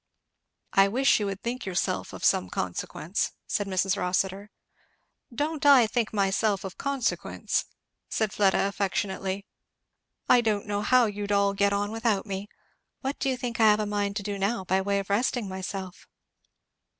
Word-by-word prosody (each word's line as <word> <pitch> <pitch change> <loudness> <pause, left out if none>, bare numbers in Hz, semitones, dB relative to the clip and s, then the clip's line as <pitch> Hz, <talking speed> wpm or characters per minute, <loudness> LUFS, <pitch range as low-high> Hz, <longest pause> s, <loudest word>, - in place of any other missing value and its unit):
"I 195 0 +6
wish 260 +6 +3
you 205 - -1
would 195 0 -5
think 245 +2 -3
yourself 185 -2 -2
of - - -5
some 90 - +3
consequence," 150 - -3
said 205 - -1
Mrs. 190 0 +1
Rossitur. 190 +2 -1 0.8
"Don't 295 +5 -2
I 275 -5 +7
think 225 0 -1
myself 200 0 +1
of 190 -1 -6
consequence!" 275 -3 -1 0.5
naid 220 -2 +1
Fleda 195 -1 +3
affectionately. 195 0 -2 0.8
"I 245 - +6
don't 215 -3 0
know 205 -1 -2
how 250 +3 +4
you'd 205 -1 -3
all 200 0 +3
get 200 0 +2
on 205 +1 -1
without 225 -3 0
me. 200 0 -5 0.5
What 270 +2 -3
do 270 - 0
you 260 - -1
think 240 -2 -4
I 220 -1 +7
have 210 0 +4
a 215 - 0
mind 205 -1 -1
to 205 - -3
do 200 0 -4
now, 200 +1 0
by 190 +1 +2
way 200 +1 0
of 200 0 -3
resting 235 +1 +1
myself?" 190 0 -6
205 Hz, 165 wpm, -27 LUFS, 195-225 Hz, 0.8 s, I